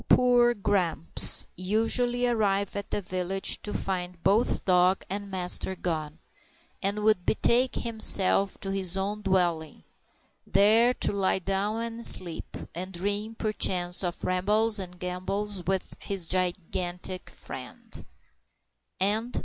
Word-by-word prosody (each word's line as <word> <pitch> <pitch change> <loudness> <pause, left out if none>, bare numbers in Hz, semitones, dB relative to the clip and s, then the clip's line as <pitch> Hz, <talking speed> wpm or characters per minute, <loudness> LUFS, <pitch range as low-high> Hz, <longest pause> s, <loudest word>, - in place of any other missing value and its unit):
Poor 245 -1 +4
Grumps 185 -6 +4
usually 225 +6 0
arrived 200 -5 0
at 200 0 -5
the - - -2
village 185 +1 -2
to 210 - -6
find 180 -3 -4
both 210 +5 +1
dog 185 0 +2
and 200 0 -5
master 190 0 +2
gone, 155 -4 -4 0.6
and 205 +2 -2
would 215 -4 +2
betake 245 +5 +1
himself 200 -4 +3
to 195 - -4
his 190 -1 -1
own 205 +2 -3
dwelling, 175 -6 -1 0.6
there 215 +5 +4
to - - 0
lie 195 -2 0
down 195 +4 -2
and 230 0 -6
sleep, 170 -7 0 0.2
and 185 +3 -6
dream, 205 +5 -3
perchance, 185 -5 +1
of 175 -1 -4
rambles 210 +4 +1
and 180 -2 -7
gambols 185 +3 -4
with 190 -1 -2
his 195 -4 -2
gigantic 180 0 -3
friend. - - -11
195 Hz, 120 wpm, -27 LUFS, 180-210 Hz, 0.6 s, Poor